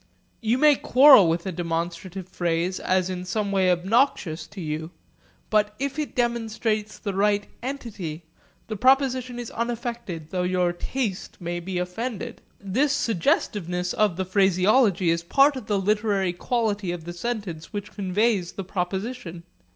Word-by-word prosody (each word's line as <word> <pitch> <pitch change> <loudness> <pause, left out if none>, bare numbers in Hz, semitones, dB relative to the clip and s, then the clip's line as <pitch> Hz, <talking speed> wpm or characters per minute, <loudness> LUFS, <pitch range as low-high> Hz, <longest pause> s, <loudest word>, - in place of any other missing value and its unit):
You 230 +2 +1
may 295 0 +5
quarrel 260 - +7
with 170 +2 -1
a 190 - -2
demonstrative 170 +2 -4
phrase 175 0 -1
as 185 -1 +1
in 180 -1 -4
some 200 +2 -2
way 190 -2 +3
obnoxious 180 - +1
to 200 - -11
you; 160 -1 -4 0.6
but 210 -1 +2
if 280 +3 -3
it 295 -6 -4
demonstrates 225 -3 -1
the 200 -3 -4
right 205 +1 +2 0.2
entity, 215 - -5 0.4
the 215 - -5
proposition 255 +1 +2
is 240 -2 -6
unaffected 235 - -4
though 185 - -1
your 180 -1 +1
taste 205 +1 -4
may 175 -1 -3
be 180 +1 -4
offended. 190 +5 -4 0.2
This 255 +9 +1
suggestiveness 180 - 0
of 210 -5 +2
the 190 - -1
phraseology 190 0 +3
is 170 0 0
part 275 +11 +4
of 255 -5 -7
the 205 - +1
literary 200 -2 +1
quality 210 -1 -1
of 175 -2 -5
the 175 +1 -6
sentence 190 -5 -4
which 205 0 -5
conveys 200 -1 0
the 195 - -5
proposition. 190 0 -4
200 Hz, 150 wpm, -25 LUFS, 180-235 Hz, 0.6 s, quarrel